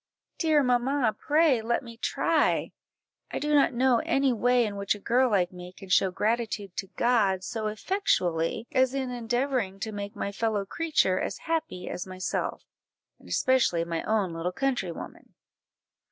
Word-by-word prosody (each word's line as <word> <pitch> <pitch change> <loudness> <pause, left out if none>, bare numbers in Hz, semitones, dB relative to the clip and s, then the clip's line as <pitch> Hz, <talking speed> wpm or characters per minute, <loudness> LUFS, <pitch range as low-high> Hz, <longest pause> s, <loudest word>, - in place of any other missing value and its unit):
Dear 310 -3 +3
mamma, 250 -1 +1
pray 300 -5 +3
let 235 +4 -1
me 230 -1 -10
try! 230 - +1 0.6
I - - -4
do 300 0 -1
not 285 -2 +5
know 250 -1 +3
any 270 -1 +2
way 245 +1 +3
in 205 -2 -4
which 200 0 0
a - - -10
girl 250 +5 +2
like 185 -5 +1
me 180 0 -10
can 195 - -11
show 190 0 +4
gratitude 210 -1 -2
to 195 - -3
God 205 -6 +2
so 220 +2 -3
effectually, 210 - 0
as 260 -1 +2
in 260 -2 -2
endeavouring 240 -4 -1
to 220 - -3
make 205 +1 -6
my 200 - -3
fellow 210 -1 -1
creature 295 - +1
as - - -3
happy 320 - -2
as 180 - -5
myself, 185 -1 -3 0.6
and - - -16
especially 255 -10 +2
my 165 -1 -2
own 205 -5 0
little 165 +2 -2
countrywoman." 245 -7 -4
225 Hz, 160 wpm, -27 LUFS, 195-260 Hz, 0.6 s, not